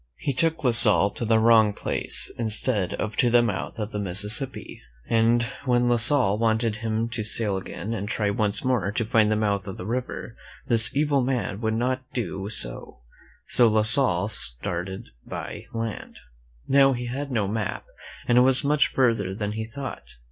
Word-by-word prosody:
He 140 - -2
took 160 +3 0
La 125 - +3
Salle 105 -3 +6
to 120 - -5
the 110 0 +3
wrong 110 -2 +4
place - - -1
instead 110 -3 -1
of 110 0 -4
to 120 - +3
the 120 0 +4
mouth 105 -2 -3
of 110 0 -4
the 105 - -4
Mississippi, 105 +8 +2 0.3
and 115 +1 +2 0.2
when 120 -1 +2
La 120 - +3
Salle 115 -3 +2
wanted 110 -1 0
him 110 0 -2
to 115 -2 -3
sail 105 -1 -1
again 95 +2 -5
and 105 -2 -4
try 105 -2 0
once 105 0 -1
more 120 -7 0
to 115 +2 -2
find 110 -2 +2
the - - +2
mouth 100 -2 -1
of 95 - -7
the 90 - -7
river, 120 0 -5 0.3
this 115 0 +2
evil 145 -1 +2
man 125 -5 -2
would 110 -1 -1
not 130 +2 -1
do 100 -4 -4
so; - - -4 0.5
so 120 - +4
La 110 -1 +2
Salle 110 -5 +2
started 90 - -3
by - - -7
land. 115 -1 -5 0.5
Now 135 0 +4
he 125 -1 -4
had 135 +4 -5
no 110 -5 0
map, 105 -1 -3 0.4
and 120 0 +4
it - - +6
was 130 +2 +3
much 145 +1 +2
further 115 -7 0
than 105 -1 -3
he 110 +1 -4
thought. 135 - -8
115 Hz, 185 wpm, -24 LUFS, 105-125 Hz, 0.5 s, Salle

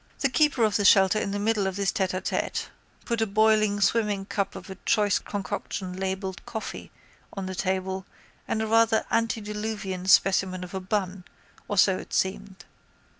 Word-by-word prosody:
The 275 - +3
keeper 290 -3 +2
of 215 -2 +3
the 205 - 0
shelter 195 0 +5
in 205 - -2
the 200 - -2
middle 205 -1 +1
of 190 - -3
this 200 -1 0
tête 185 -2 -1
à - - -17
tête - - -2 0.4
put 235 -2 -1
a 225 - +2
boiling 215 0 +3
swimming 205 -2 +1
cup 200 -1 -2
of - - -9
a - - -6
choice 205 -1 +2
concoction 195 -2 -5
labelled 190 0 -4
coffee 220 - -6 0.4
on 195 -1 -5
the 190 - -4
table 190 0 -2 0.4
and 220 - -1
a - - -1
rather 225 0 +3
antediluvian 210 -4 -2
specimen 190 -1 +3
of 180 - -9
a 190 - -2
bun, 190 -1 -2 0.4
or 205 - -3
so 190 0 +4
it - - -11
seemed. 190 0 -2
200 Hz, 175 wpm, -26 LUFS, 190-215 Hz, 0.4 s, shelter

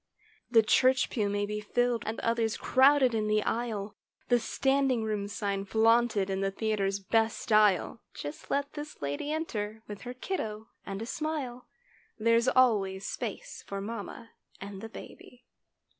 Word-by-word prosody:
The 230 -2 +6
church 255 +4 +3
pew 210 -4 0
may 205 0 0
be 210 +1 -3
filled 245 +2 0
and 220 - -3
others 230 -1 0
crowded 265 -1 +4
in 215 -1 0
the 215 0 +2
aisle; 215 -3 -2 0.3
The 245 -1 +5
"standing 270 0 +1
room" 210 -2 -2
sign 200 -1 -2
flaunted 220 -1 +3
in 195 0 -2
the 195 - +1
theatre's 200 -1 -1
best 225 +3 +1
style; 210 -1 +3
Just 145 +1 -7
let 280 0 -1
this 295 - -8
lady 145 - -2
enter 220 -9 -3
with 205 -1 -8
her 250 0 -7
"kiddo" 220 - -4 0.2
and 195 +2 -4
a - - -5
smile— 270 -3 -4 0.5
There's 230 +2 +3
always 200 -7 +3
space - - -5
for 200 - -4
mamma 225 +2 -7 0.3
and 195 0 -8
the 225 - -7
baby. 245 +2 -12
220 Hz, 155 wpm, -29 LUFS, 205-245 Hz, 0.5 s, The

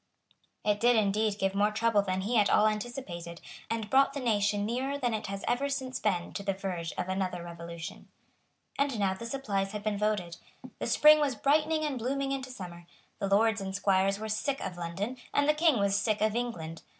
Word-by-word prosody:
It 205 -1 +2
did 240 +2 +4
indeed 210 0 +1
give 195 -1 0
more 205 +1 +3
trouble 220 -1 +2
than 190 -1 -2
he 220 +6 -1
at 210 -2 +4
all 210 - +5
anticipated, 210 -6 -3 0.3
and 225 -2 -2
brought 275 +4 +4
the 280 - -3
nation 205 -4 +1
nearer 260 +5 -1
than 245 -4 0
it 215 - -3
has 195 0 -5
ever 275 +4 +1
since 265 -2 -3
been 180 -5 -1
to - - -4
the 195 -1 -1
verge 180 -4 -4
of 180 - -3
another 185 -2 -2
revolution. 170 -1 -8 0.7
And 280 -4 +1
now 195 -2 +2
the 230 +5 -7
supplies 205 -7 -2
had 210 -1 -5
been 210 -2 -1
voted. 205 -5 -1 0.4
The - - -2
spring 305 0 +7
was 285 -4 +1
brightening 305 +5 +2
and 275 -4 -2
blooming 270 +3 -1
into 265 -1 -3
summer. 175 -7 -9 0.3
The 200 - -1
lords 220 +2 +3
and 190 0 -4
squires 195 0 +2
were 220 +1 -5
sick 220 +6 -1
of 185 - -5
London; 180 +8 -4 0.2
and 285 0 +3
the 300 - +5
King 305 -3 +3
was 200 -1 +2
sick 215 +1 0
of 215 0 +1
England. 165 -10 -4
210 Hz, 205 wpm, -30 LUFS, 195-250 Hz, 0.7 s, spring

